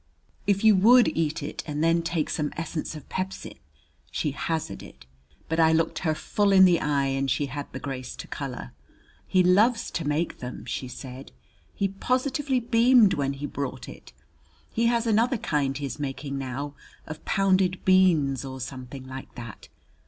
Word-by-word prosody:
"If 200 0 +2
you 220 -2 +7
would 240 +5 +6
eat 160 -2 -1
it 145 - -5
and 150 0 -2
then 165 +1 +3
take 165 -2 -1
some 150 -1 -1
essence 165 0 -4
of 150 - -10
pepsin 185 - -5 0.3
" 75 0 -40
she 150 - -1
hazarded. 145 - -5 0.4
But 165 +1 -1
I 160 0 +5
looked 165 0 +1
her 155 -2 0
full 200 +5 +1
it 190 - +7
the 180 -2 +6
eye 145 -2 +1
and 135 0 -1
she 140 +3 +1
had 140 +1 -6
the 130 - -6
grace 130 -2 -6
to - - -9
color. 135 -3 -6 0.5
"He 185 -1 +3
loves 215 +7 +3
to 170 - -3
make 150 +3 -1
them," 125 0 -7
she 130 - -4
said 130 +1 -9 0.4
"he 200 - +1
positively 255 +6 0
beamed 235 -2 +5
when 140 -1 -1
he 140 +1 -6
brought 140 -2 -5
it. 60 0 -12 0.6
He 230 +1 +1
has 235 0 +1
another 230 +3 +2
kind 145 -8 -1
he 145 - -4
is 135 +2 -6
making 140 0 -4
now 135 +2 -4 0.3
of 155 0 -8
pounded 190 -1 +1
beans, 170 -8 +4
or 130 -1 -7
something 130 0 -7
like 130 0 -9
that. 115 -4 -9
155 Hz, 175 wpm, -26 LUFS, 135-195 Hz, 0.6 s, you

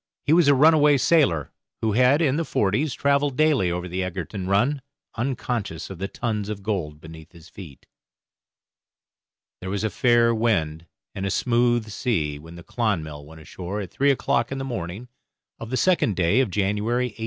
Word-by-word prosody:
He 150 - +3
was 170 -2 +5
a 145 - +6
runaway 150 0 +5
sailor, 130 - +2 0.3
who 110 - +1
had, 130 +8 +3
in 135 -3 +2
the 165 - 0
forties, 125 +3 0
travelled 140 -1 +1
daily 150 - +3
over 90 +1 -3
the 90 +1 -3
Egerton 95 +1 -5
run, 120 +9 +1 0.3
unconscious 115 - -3
of 95 - -9
the 95 - -2
tons 105 -2 -3
of 100 -2 -6
gold 85 -8 -3
beneath 80 +2 -13
his 85 -1 -15
feet. 80 -6 -12 1.7
There 95 - -6
was 100 +2 -2
a 110 - -1
fair 120 -2 +3
wind 85 -8 -1 0.3
and 95 - -5
a 100 - -1
smooth 120 0 +1
sea 80 - -2
when 80 +3 -12
the 85 - -11
'Clonmel' 80 -12 -3
went 80 +1 -13
ashore 90 +5 -6
at 95 -4 -6
three 140 +1 +1
o'clock 125 -3 0
in 135 - -3
the 135 - -4
morning 105 -2 -5 0.5
of 115 - -7
the 130 - -1
second 175 - +2
day 85 +6 +2
of 130 -5 +2
January, 105 +6 0
1841. 105 - -19
105 Hz, 180 wpm, -23 LUFS, 90-130 Hz, 1.7 s, a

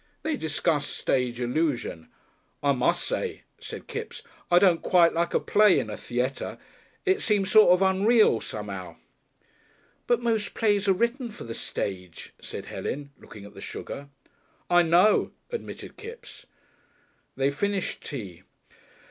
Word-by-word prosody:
They 315 0 0
discussed 160 - -1
stage 125 -2 0
illusion. 125 - -1 0.6
"I 140 - +4
mus' 125 -2 +1
say," - - -3 0.2
said - - -8
Kipps, - - -6 0.3
"I 175 - +5
don't 180 -3 +5
quite 175 -3 +4
like 170 +1 0
a - - +5
play 210 -2 +4
in 110 - -2
a - - -4
theayter. 125 +3 -3 0.5
It 385 +2 +2
seems 205 -3 +1
sort 215 -3 +7
of 180 +2 +5
unreal, 195 - +4
some'ow." 100 -4 -6 1.1
"But 240 - +3
most 225 -3 0
plays 205 -3 +2
are 195 - +6
written 235 +5 -1
for 210 - -10
the 115 - -6
stage," 90 -6 -5
said - - -7
Helen, 140 0 -5
looking 100 -2 -12
at 100 - -13
the - - -11
sugar. 140 0 -7 0.6
"I 175 0 +7
know," 175 +5 +4 0.2
admitted 470 - -7
Kipps. 460 +2 -11 0.9
They 135 +1 +1
finished 200 +5 -2
tea. 100 - -7
170 Hz, 140 wpm, -26 LUFS, 125-210 Hz, 1.1 s, sort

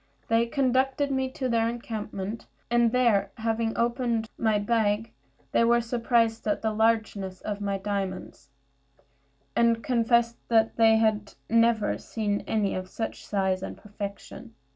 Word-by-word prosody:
They 230 +1 +3
conducted 265 +2 +1
me 265 -1 0
to 260 - -2
their 230 -1 +1
encampment; 220 -3 -5 0.2
and 240 -1 +4
there, 230 -6 +3
having 225 0 -1
opened 235 -2 0
my 220 -2 +1
bag, 215 0 0 0.4
they - - +3
were 235 +1 +4
surprised 230 -1 0
at 210 - 0
the 220 - +1
largeness 215 -4 0
of 205 -1 -4
my 200 -1 -1
diamonds, 195 -6 -4 1.1
and 230 -1 +3
confessed 235 -1 +2
that 225 -1 +3
they 225 -1 +5
had 215 -2 0 0.2
never 230 -2 +3
seen 205 -2 -2
any 210 -3 0
of 185 0 -5
such 225 - -5
size 190 -2 0
and - - -6
perfection. 210 +2 -8
225 Hz, 140 wpm, -27 LUFS, 205-235 Hz, 1.1 s, they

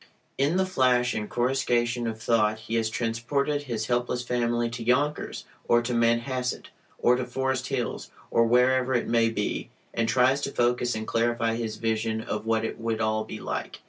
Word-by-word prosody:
In 145 +6 +2
the 190 - +3
flash 125 -8 +2
and 105 -1 -3
coruscation 120 -2 0
of 110 -1 -4
thought 110 -1 +1
he 110 - -7
has 115 -1 +1
transported 125 +6 -1
his 115 -4 -2
helpless 120 +1 -1
family 120 -1 0
to 115 0 -5
Yonkers, 140 +5 0 0.2
or 120 0 +4
to 120 +1 -2
Manhasset, 120 +2 0 0.3
or 125 - +4
to 130 - -1
Forest 130 +1 -2
Hills, 125 -3 -3 0.2
or 115 - +4
wherever 125 +2 +3
it 120 - 0
may 115 -1 +3
be, 105 -2 -3 0.2
and 115 -1 0
tries 130 +3 +3
to 140 - -2
focus 120 -1 +1
and 110 0 -4
clarify 115 0 +1
his 115 -2 -3
vision 110 0 -1
of 110 0 -4
what 115 0 +1
it - - -5
would 115 -1 -2
all 110 0 +1
be - - -7
like. - - -5
120 Hz, 180 wpm, -26 LUFS, 115-125 Hz, 0.3 s, or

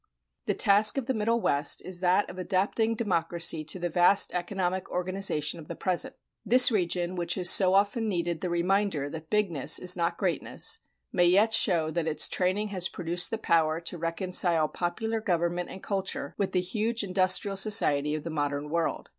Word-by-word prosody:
The - - 0
task 205 +4 +4
of 270 - -2
the 260 - -2
Middle 230 +1 -1
West 145 -8 0
is 185 -1 -3
that 185 +2 +1
of 185 - -10
adapting 205 +5 -1
democracy 170 -6 -1
to 160 - -2
the 175 -1 -3
vast 175 +4 +3
economic 180 +1 -3
organization 180 -4 -1
of 155 - -12
the - - -7
present. 185 -2 0 0.3
This 250 +1 +7
region 180 -3 -1
which 175 0 -2
has 180 -2 +5
so 190 -1 +6
often 205 +3 0
needed 170 -3 -3
the 180 - -3
reminder 175 -4 -1
that 160 0 -9
bigness 195 -10 +2
is 180 0 +4
not 170 -1 -2
greatness, 180 -7 -1 0.3
may 175 - +3
yet 205 +5 +3
show 170 -8 +2
that 165 -1 -3
its 160 - +3
training 190 +3 -1
has 185 -3 -1
produced 175 0 -1
the 225 - -3
power 165 -6 0
to 175 +1 -7
reconcile 170 -1 +1
popular 220 +8 -4
government 175 -2 -2
and 190 - -11
culture 190 -7 -4
with 200 - -3
the 180 - +1
huge 220 +5 -2
industrial 185 +1 0
society 150 -8 +2
of 155 - -6
the 165 - -6
modern 145 -1 -3
world. 170 0 -3
180 Hz, 180 wpm, -27 LUFS, 170-200 Hz, 0.3 s, This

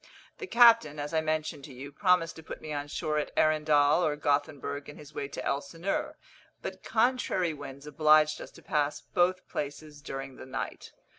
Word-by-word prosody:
The 405 - -5
captain, 230 - +6
as 145 +2 -4
I 160 - +3
mentioned 155 -2 -2
to 140 - -11
you, 135 +3 -8
promised 180 +1 +2
to - - -9
put 155 - -8
me 155 - -6
on 145 0 -3
shore 150 +1 -1
at - - -3
Arendall 155 +1 +4
or 150 -3 +1
Gothenburg 145 0 -1
in 145 - -10
his 150 0 -13
way 140 - -3
to 140 - -6
Elsineur, 165 +7 -2 0.5
but - - -6
contrary 220 -8 +1
winds 140 -1 -9
obliged 155 +1 +4
us - - -8
to - - -15
pass 150 -1 0
both 180 +1 +1
places 145 +1 -6
during 135 -2 -6
the - - -9
night. 130 0 -5
150 Hz, 180 wpm, -29 LUFS, 145-160 Hz, 0.5 s, captain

